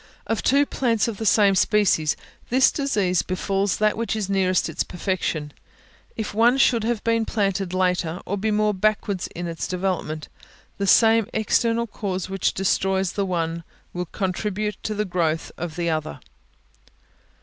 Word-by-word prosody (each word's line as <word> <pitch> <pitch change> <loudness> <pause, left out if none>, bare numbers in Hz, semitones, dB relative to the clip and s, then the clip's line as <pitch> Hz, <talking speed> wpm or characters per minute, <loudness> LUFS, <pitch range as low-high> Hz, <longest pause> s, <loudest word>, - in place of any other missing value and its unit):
Of 220 +1 -1
two 280 +2 +3
plants 230 -6 0
of 225 -3 -4
the 220 - -2
same 200 -2 +5
species, 190 -6 +2 0.3
this 260 +2 +4
disease 205 - +1
befalls 195 +1 -1
that 215 0 +2
which 230 0 -2
is 200 -3 -2
nearest 185 -1 +2
its - - -2
perfection; 170 -5 -3 0.6
if 220 -2 -3
one 235 +4 +4
should 235 -4 +3
have 230 -1 -1
been 230 0 +2
planted 195 -4 -1
later, 180 -2 0
or 200 - -2
be 210 +2 -1
more 210 0 +2
backward 200 -1 0
in 175 - -4
its 165 -1 -4
development, 180 -4 -2 0.5
the 200 - 0
same 225 +1 +5
external 230 +2 +1
cause 190 -4 -4
which 195 -1 0
destroys 190 0 +1
the 200 -1 -2
one 165 -2 -2 0.3
will 180 0 -3
contribute 205 +3 -3
to 215 - -3
the 210 +1 -1
growth 165 -4 -1
of 170 -2 -5
the 170 -1 -1
other. 155 - -3
195 Hz, 160 wpm, -23 LUFS, 180-215 Hz, 0.6 s, same